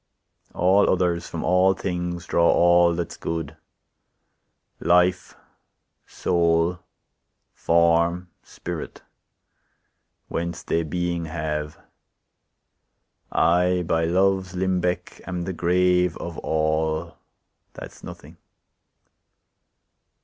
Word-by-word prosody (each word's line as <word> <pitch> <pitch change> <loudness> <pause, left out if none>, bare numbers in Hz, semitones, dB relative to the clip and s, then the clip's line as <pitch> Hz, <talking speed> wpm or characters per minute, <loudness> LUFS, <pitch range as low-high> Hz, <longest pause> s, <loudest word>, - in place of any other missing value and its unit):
All 95 +3 +3
others, 90 -2 0
from - - -5
all 95 +1 +3
things, 90 -2 -4
draw 85 0 +2
all 85 0 +4
that's 85 -2 -4
good, 80 -2 -4 1.2
Life, 90 +1 +2 0.7
soul, 85 0 +1 0.7
form, 85 +1 +1
spirit, 85 -2 -8 1.2
whence 85 +2 -4
they 85 - 0
being 85 +1 -2
have; 75 -1 -4 1.5
I, 90 +1 +2
by 80 0 +1
Love's 95 +1 +1
limbec, 90 -1 -2
am 90 -2 -3
the 95 +2 -4
grave 90 0 +2
Of 85 -1 -7
all, 80 0 -1 0.6
that's - - -11
nothing. - - -11
85 Hz, 85 wpm, -23 LUFS, 85-90 Hz, 1.5 s, all